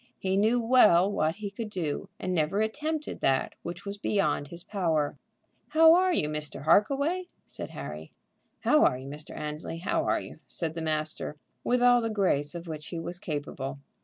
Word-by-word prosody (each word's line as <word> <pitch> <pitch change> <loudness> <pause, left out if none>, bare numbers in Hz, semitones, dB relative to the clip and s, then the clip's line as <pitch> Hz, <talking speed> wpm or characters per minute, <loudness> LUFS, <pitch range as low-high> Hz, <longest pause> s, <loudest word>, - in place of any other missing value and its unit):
He 190 0 -1
knew 220 +5 +3
well 215 -6 +5
what 160 -4 0
he 205 -1 -6
could 215 +1 -5
do, 180 -1 -3
and 185 - -2
never 170 +4 +1
attempted 300 +8 -2
that 135 -1 +1
which 175 +2 -7
was 200 0 -5
beyond 150 -9 0
his 170 +3 -9
power. 160 -7 0 0.5
"How 320 +2 +7
are 370 +1 +4
you, 150 - +2
Mr. 150 -2 -2
Harkaway?" 280 - +2 0.2
said - - -4
Harry. 75 +2 -7 0.5
"How - - +4
are 125 - +3
you, 130 +1 -9
Mr. 150 +2 -7
Annesley? 150 +2 -4
how 170 - 0
are - - +2
you?" - - -10
said 165 -2 -3
the 165 - -5
master, 155 -1 -2 0.3
with 245 0 +2
all 245 0 +6
the 225 - -1
grace 175 -8 +1
of 170 0 -7
which 155 -2 -6
he 170 - -5
was 175 +2 -6
capable. 145 -3 -4
175 Hz, 185 wpm, -28 LUFS, 150-220 Hz, 0.5 s, How